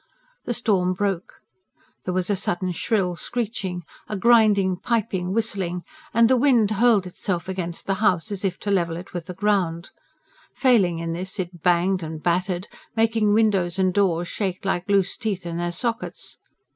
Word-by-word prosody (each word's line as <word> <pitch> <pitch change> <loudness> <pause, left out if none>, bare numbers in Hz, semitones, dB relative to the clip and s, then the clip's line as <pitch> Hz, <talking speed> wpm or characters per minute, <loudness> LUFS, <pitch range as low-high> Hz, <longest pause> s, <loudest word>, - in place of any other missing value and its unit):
The 240 - -1
storm 195 -6 +1
broke; 195 -2 -3 0.6
there 180 - -1
was 185 +2 0
a - - +2
sudden 185 0 -1
shrill 180 0 0
screeching, 200 -4 -3 0.3
a 210 - -2
grinding, 205 -4 +4
piping, 195 -4 -1
whistling, 190 -5 -1 0.3
and 230 0 +5
the 260 - +4
wind 240 -5 +3
hurled 215 -2 +4
itself 180 -1 -3
against 180 -3 -4
the 195 - +1
house 195 -1 +2
as 200 -1 -4
if 185 -2 -1
to 205 - -2
level 170 -4 +1
it 180 +3 -10
with 175 -2 -5
the 180 - -6
ground; 185 -4 0 0.6
failing 210 -10 +3
in 165 0 -3
this, 185 +4 -5
it 175 -2 -5
banged 180 +2 +2
and 160 -1 -6
battered, 180 +1 0 0.3
making 225 -2 +2
windows 195 -5 +2
and 185 -1 +2
doors 175 -4 +1
shake 190 -1 -3
like 185 0 -1
loose 195 -1 +2
teeth 205 -6 -3
in 170 -1 -4
their 175 0 -1
sockets. 230 +6 -3
190 Hz, 170 wpm, -23 LUFS, 175-215 Hz, 0.6 s, and